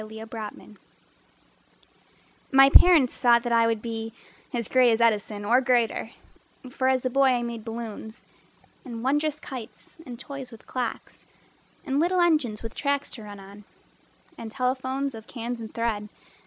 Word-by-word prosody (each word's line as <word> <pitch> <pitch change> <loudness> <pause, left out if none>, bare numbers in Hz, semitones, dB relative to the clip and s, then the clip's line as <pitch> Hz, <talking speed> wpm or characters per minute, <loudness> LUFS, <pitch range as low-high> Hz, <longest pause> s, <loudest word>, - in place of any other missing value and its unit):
Walter 220 +1 -8
Simmons 210 - -16 1.7
My 270 0 +7
parents 320 -8 +6
thought 235 -2 +5
that 240 - -2
I 230 0 +4
would 225 -2 -1
be 225 -1 -5 0.4
As 235 -3 -2
great 255 -1 +4
as 225 0 +2
Edison 210 -2 +1
or 245 +5 +4
greater: 240 -3 +1 0.6
For 260 0 -1
as 260 -1 +1
a - - +2
boy 275 +2 +4
I 240 -1 0
made 235 -2 -5
balloons 225 -1 -7 0.6
And 235 -3 -7
wondrous 295 +3 +1
kites 255 +3 -9
and 245 -6 -9
toys 275 -3 -7
with 230 - -14
clocks 250 -3 -5 0.6
And 270 +1 0
little 355 +3 +2
engines 300 -12 +2
with 225 - -6
tracks 285 0 -1
to 230 - -8
run 205 -1 -10
on 200 +2 -13 0.8
And 225 - -6
telephones 260 +2 -2
of 220 -1 -10
cans 235 -1 -5
and 220 - -7
thread. 220 -3 -2
235 Hz, 155 wpm, -26 LUFS, 225-265 Hz, 1.7 s, My